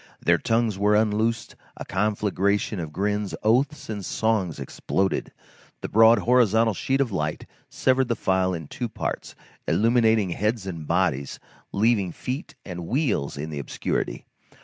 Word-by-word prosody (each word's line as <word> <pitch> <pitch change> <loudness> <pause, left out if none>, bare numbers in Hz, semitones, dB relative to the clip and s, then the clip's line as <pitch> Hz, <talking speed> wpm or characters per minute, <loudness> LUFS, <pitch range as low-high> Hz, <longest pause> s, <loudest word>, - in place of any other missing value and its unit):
Their - - +3
tongues 115 -3 0
were 105 +1 +3
unloosed; 110 +2 0 0.2
a - - -6
conflagration 100 0 0
of 80 -3 -5
grins, 105 +3 -1
oaths, 130 +7 +1
and 105 -3 -5
songs 100 -8 0
exploded. 95 +7 -2 0.5
The - - -4
broad 115 +1 +6
horizontal 115 -2 +3
sheet 135 +8 -1
of 135 -5 +1
light 75 -5 -2 0.2
severed 130 0 +2
the 115 - 0
file 95 -2 +1
in 80 -3 -7
two 120 - -4
parts, - - -4 0.3
illuminating 110 -3 +3
heads 105 +3 -1
and 85 -5 -6
bodies, 80 -6 0 0.3
leaving 100 -3 +2
feet 130 - -5
and 90 -3 -6
wheels 120 - 0
in 75 +2 -5
the 75 - -4
obscurity. 70 - -3
105 Hz, 145 wpm, -25 LUFS, 95-115 Hz, 0.5 s, broad